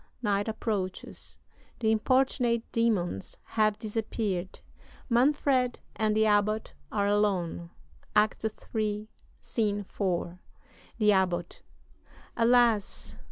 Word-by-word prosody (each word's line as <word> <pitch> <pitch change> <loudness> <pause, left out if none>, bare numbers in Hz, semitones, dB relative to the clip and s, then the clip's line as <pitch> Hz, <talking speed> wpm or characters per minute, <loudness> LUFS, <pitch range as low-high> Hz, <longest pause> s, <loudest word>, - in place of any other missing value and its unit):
Night 205 -1 +1
approaches. 205 -4 -4 0.4
The 220 -2 +2
importunate 240 0 +2
demons 200 - 0
have 215 -1 +1
disappeared. 210 -4 -3 0.5
Manfred 255 0 +3 0.2
and 215 -1 +1
the 220 0 +4
Abbot 215 +1 +1 0.2
are 205 -2 +1
alone 195 -5 0 0.5
(Act 210 +1 +3
III., 215 -1 -3 0.3
Scene 205 -3 -1
IV.): 180 -3 -2 0.6
"THE 210 -2 +4
ABBOT. 180 -3 0 0.7
Alas! 230 -3 +2
215 Hz, 90 wpm, -29 LUFS, 200-230 Hz, 0.7 s, the